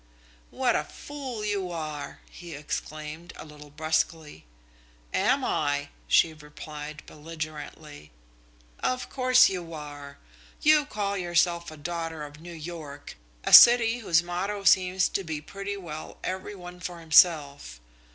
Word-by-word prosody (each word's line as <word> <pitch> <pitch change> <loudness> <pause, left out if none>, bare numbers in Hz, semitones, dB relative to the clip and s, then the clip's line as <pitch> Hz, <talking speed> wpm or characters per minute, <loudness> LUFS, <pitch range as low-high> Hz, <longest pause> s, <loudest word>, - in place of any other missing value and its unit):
"What - - +1
a - - +1
fool 265 -7 -7
you 200 -3 -1
are!" 155 -3 -6
he 170 -3 -9
exclaimed, 155 +3 -6
a - - -10
little 150 -1 -13
brusquely. 155 - -2 0.7
"Am - - +2
I!" 145 -1 -1 0.2
she 160 - +4
replied 150 0 -9
belligerently. 155 - -8 0.7
"Of 255 0 -2
course 255 -1 +5
you 175 -3 -5
are! 145 -2 -9 0.5
You 300 -1 +5
call 200 -5 -2
yourself 175 -1 +1
a 155 - -11
daughter 165 0 -4
of 145 +1 -11
New 175 +1 -10
York, 155 -3 -8 0.3
a - - -1
city 235 0 +9
whose 170 -7 +2
motto 195 +4 -3
seems 185 -1 +4
to 195 - -2
be 160 -3 -4
pretty 195 +6 -6
well 155 -5 -8
every 190 +2 -4
one 180 -1 -10
for 175 0 -6
himself. 150 - +3
165 Hz, 130 wpm, -27 LUFS, 150-190 Hz, 0.7 s, city